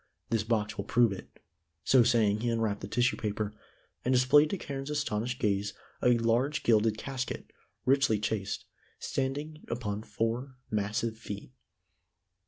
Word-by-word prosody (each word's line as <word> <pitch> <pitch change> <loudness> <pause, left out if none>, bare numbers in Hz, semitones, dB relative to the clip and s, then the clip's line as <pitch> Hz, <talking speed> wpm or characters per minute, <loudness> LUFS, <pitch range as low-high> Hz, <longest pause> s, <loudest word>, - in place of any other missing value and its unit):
This 115 -2 +3
box 110 -2 0
will - - -2
prove 120 -2 +4
it." 95 - -7 0.5
So 130 - +6
saying 115 -3 +3
he 120 +2 0
unwrapped 110 -3 0
the - - -5
tissue 120 +1 +2
paper, 105 -1 -2 0.5
and 125 - +1
displayed 130 +4 +6
to 195 - -1
Carne's 135 -4 -5
astonished 125 -5 -1
gaze 100 -1 0 0.3
a 125 -1 +5
large 120 +6 +1
gilded 110 -1 +3
casket, 130 +1 -5 0.3
richly 135 -4 +4
chased, 105 -1 -2 0.3
standing 145 +4 -3
upon 105 -3 -3
four 115 +4 -2 0.2
massive 110 +2 -1
feet. 105 +1 -7
115 Hz, 140 wpm, -30 LUFS, 105-130 Hz, 0.5 s, So